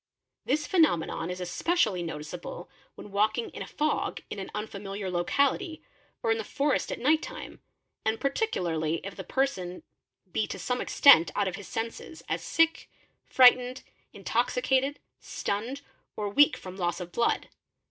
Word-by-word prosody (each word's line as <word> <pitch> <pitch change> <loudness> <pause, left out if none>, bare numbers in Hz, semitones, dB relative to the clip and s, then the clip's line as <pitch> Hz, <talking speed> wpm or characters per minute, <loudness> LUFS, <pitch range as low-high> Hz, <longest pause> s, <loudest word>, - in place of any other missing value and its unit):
This 300 +1 +1
phenomenon 175 - +2
is 180 0 -4
especially 185 - +1
noticeable 170 +2 -6 0.3
when 205 - -11
walking 215 +3 +1
in - - -8
a - - -5
fog 305 +1 -1
in 205 - -4
an 190 - -6
unfamiliar 200 -2 -5
locality, 280 - 0 0.4
or 225 - +2
in 225 - +1
the - - -2
forest 285 +6 0
at - - -3
night 310 +5 +3
time, - - -8 0.4
and 220 0 0
particularly 170 - 0
if 195 - -6
the 190 - -6
person 185 -6 -2 0.5
be 215 - 0
to - - -5
some 250 0 -2
extent 255 - +7
out 205 -1 +1
of 185 - -2
his 205 - -9
ser 225 +1 -2
ses, 320 - -11
as - - -1
sick, 330 0 +1 0.4
frightened, 250 0 +5 0.3
intoxicated, 275 - 0 0.2
stunned, 230 +8 -3 0.3
or 210 -1 -2
weak 290 +8 +5
from 185 0 -9
loss 175 -1 -1
of 175 -1 -7
blood. 235 +4 0
220 Hz, 155 wpm, -28 LUFS, 180-275 Hz, 0.5 s, extent